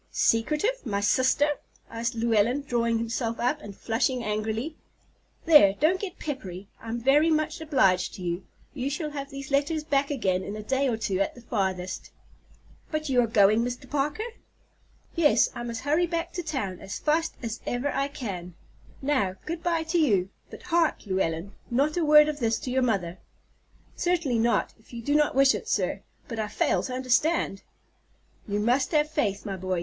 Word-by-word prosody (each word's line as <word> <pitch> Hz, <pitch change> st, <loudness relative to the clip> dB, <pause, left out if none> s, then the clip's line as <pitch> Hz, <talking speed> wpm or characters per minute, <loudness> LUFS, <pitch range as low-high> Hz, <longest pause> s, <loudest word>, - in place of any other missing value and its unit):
"Secretive! 300 Hz, -, +1 dB
My 200 Hz, -5 st, -1 dB
sister?" 260 Hz, +7 st, +3 dB, 0.4 s
said 230 Hz, +1 st, -2 dB
Llewellyn, 230 Hz, +4 st, +2 dB
drawing 235 Hz, -3 st, +1 dB
himself 230 Hz, 0 st, -2 dB
up 255 Hz, +5 st, 0 dB
and 200 Hz, -8 st, -10 dB
flushing 240 Hz, +2 st, 0 dB
angrily. 220 Hz, +8 st, -2 dB, 0.7 s
"There, 295 Hz, -, +7 dB
don't 345 Hz, +6 st, +3 dB
get 380 Hz, -3 st, -6 dB
peppery. 195 Hz, -, -6 dB
I'm 230 Hz, +1 st, -4 dB
very 285 Hz, +6 st, +4 dB
much 310 Hz, +1 st, 0 dB
obliged 195 Hz, -, +2 dB
to 185 Hz, -, -8 dB
you. 175 Hz, +1 st, -2 dB, 0.3 s
You 270 Hz, -1 st, -2 dB
shall 300 Hz, +1 st, -3 dB
have 280 Hz, -1 st, -5 dB
these 275 Hz, 0 st, -8 dB
letters 295 Hz, +3 st, +1 dB
back 280 Hz, -2 st, +1 dB
again 190 Hz, -10 st, 0 dB
in 205 Hz, -, -5 dB
a 215 Hz, -, -6 dB
day 265 Hz, +5 st, +1 dB
or 235 Hz, -3 st, 0 dB
two 200 Hz, -4 st, -1 dB
at 195 Hz, -, 0 dB
the 245 Hz, -, -12 dB
farthest." 190 Hz, -5 st, -2 dB, 0.8 s
"But 310 Hz, -1 st, -2 dB
are -, -, -1 dB
you 245 Hz, -2 st, +4 dB
going, 215 Hz, 0 st, +4 dB
Mr. 245 Hz, +2 st, -4 dB
Parker?" 295 Hz, -, -1 dB, 0.9 s
"Yes; 325 Hz, -4 st, +4 dB
I -, -, -6 dB
must 235 Hz, -1 st, -4 dB
hurry 310 Hz, +5 st, +2 dB
back 335 Hz, 0 st, -3 dB
to 355 Hz, -, -3 dB
town 260 Hz, -, -3 dB
as 195 Hz, -, -6 dB
fast 315 Hz, +2 st, 0 dB
as 230 Hz, 0 st, -4 dB
ever 245 Hz, +4 st, -1 dB
I 275 Hz, 0 st, 0 dB
can. 195 Hz, -, -6 dB, 0.5 s
Now, 235 Hz, -10 st, +1 dB
good 330 Hz, +1 st, -4 dB
by 335 Hz, -1 st, 0 dB
to 330 Hz, +2 st, 0 dB
you; 200 Hz, -, +2 dB, 0.2 s
but -, -, -11 dB
hark, 340 Hz, -6 st, +1 dB
Llewellyn, 185 Hz, -1 st, -1 dB, 0.2 s
not 280 Hz, +5 st, +1 dB
a 350 Hz, -, +1 dB
word 300 Hz, 0 st, +7 dB
of 300 Hz, -1 st, -3 dB
this 225 Hz, -3 st, +1 dB
to 255 Hz, -, -4 dB
your 260 Hz, +1 st, +2 dB
mother." 195 Hz, -8 st, -1 dB, 0.8 s
"Certainly 335 Hz, -9 st, +1 dB
not, 235 Hz, +1 st, +1 dB
if 220 Hz, -, -21 dB
you 235 Hz, -1 st, -6 dB
do 285 Hz, -, 0 dB
not 300 Hz, -2 st, +3 dB
wish 270 Hz, 0 st, +6 dB
it, -, -, -5 dB
sir; -, -, 0 dB, 0.3 s
but 230 Hz, -2 st, -5 dB
I 215 Hz, -, -1 dB
fail 290 Hz, +9 st, +1 dB
to 255 Hz, -, -5 dB
understand." 255 Hz, -, +1 dB, 0.9 s
"You 205 Hz, 0 st, -1 dB
must 250 Hz, +7 st, +1 dB
have 300 Hz, 0 st, +3 dB
faith, 215 Hz, -10 st, -1 dB
my 195 Hz, -2 st, -4 dB
boy. 185 Hz, -1 st, -2 dB
250 Hz, 185 wpm, -27 LUFS, 215-300 Hz, 0.9 s, There